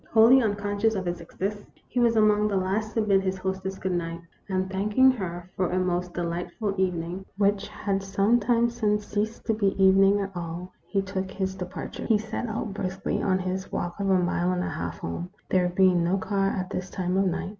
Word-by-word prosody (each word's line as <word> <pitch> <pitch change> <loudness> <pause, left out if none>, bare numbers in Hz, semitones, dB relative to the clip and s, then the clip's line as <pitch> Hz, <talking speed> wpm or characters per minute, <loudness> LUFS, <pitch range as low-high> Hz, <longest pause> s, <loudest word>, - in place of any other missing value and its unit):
Wholly 235 +4 +7
unconscious 205 0 0
of 190 -2 -2
its 175 0 -3
existence, 200 +4 -4 0.2
he 250 - -2
was 235 -1 +4
among 210 -1 +4
the 205 - -1
last 200 +4 -1
to 225 - +3
bid 195 -2 +3
his 190 0 -1
hostess 190 0 -3
good 190 - -2
night; 170 -1 -2 0.3
and, 185 0 0
thanking 210 +7 +4
her 175 -7 -5
for 185 - 0
a 180 - -1
most 180 -1 -1
delightful 175 +5 -2
evening, 180 0 -2
which 200 0 +2
had 200 -2 -2
some 195 +4 +2
time 235 +1 +3
since 210 -3 0
ceased 215 +3 -3
to 225 - +2
be 200 -3 +1
evening 195 +1 +6
at 195 -1 -4
all, 175 +1 -5
he 195 -1 0
took 190 -1 -3
his 190 0 -2
departure. 180 -1 -6
He 220 - +4
set 220 +3 -4
out 215 -2 -3
briskly 190 -1 -2
on 185 -1 +2
his 185 +1 -3
walk 175 +2 -3
of 200 -1 0
a 190 - +5
mile 175 0 +1
and 180 0 0
a - - -2
half 85 0 -4
home, 170 - -5 0.2
there 180 -1 +3
being 180 -1 +4
no 180 +3 +2
car 195 0 0
at 185 -2 -3
this 185 0 -4
time 180 0 -2
of 195 +1 +3
night. 185 +1 -2
195 Hz, 210 wpm, -26 LUFS, 180-210 Hz, 0.3 s, Wholly